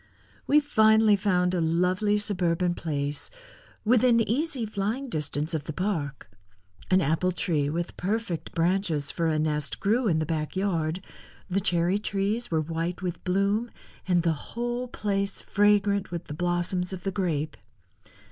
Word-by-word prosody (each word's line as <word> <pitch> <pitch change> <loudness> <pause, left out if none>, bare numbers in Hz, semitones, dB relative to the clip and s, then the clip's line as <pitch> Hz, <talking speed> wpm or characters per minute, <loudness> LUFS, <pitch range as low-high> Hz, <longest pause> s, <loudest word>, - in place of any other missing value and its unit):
We 295 - +6
finally 220 -6 +4
found 185 -3 +1
a 180 - +1
lovely 180 +5 +2
suburban 180 -4 +1
place 145 -4 -3 0.6
within 235 +1 +4
easy 260 +3 0
flying 220 +6 -3
distance 155 -2 -1
of 150 -2 -2
the 155 - -5
park. 155 - -3 0.6
An 185 0 +4
apple 165 +4 +1
tree 155 -5 0
with 170 +3 -3
perfect 185 -5 -2
branches 165 -4 +1
for 165 -1 -1
a 155 -1 +1
nest 150 -2 0
grew 225 +4 +1
in 165 -5 +2
the 155 - 0
back 155 -1 -3
yard, 180 -2 -1 0.5
the 195 +2 +1
cherry 180 0 +2
trees 210 +3 -1
were 160 -2 +1
white 165 +3 -3
with 180 -2 -4
bloom 200 +5 +1 0.4
and 175 -2 +3
the 165 -1 +2
whole 240 +9 -4
place 200 -4 -2
fragrant 205 -1 +2
with 175 0 -4
the - - -7
blossoms 175 +2 -1
of 180 - -7
the 195 - -1
grape. 160 -6 -1
180 Hz, 150 wpm, -27 LUFS, 165-205 Hz, 0.6 s, We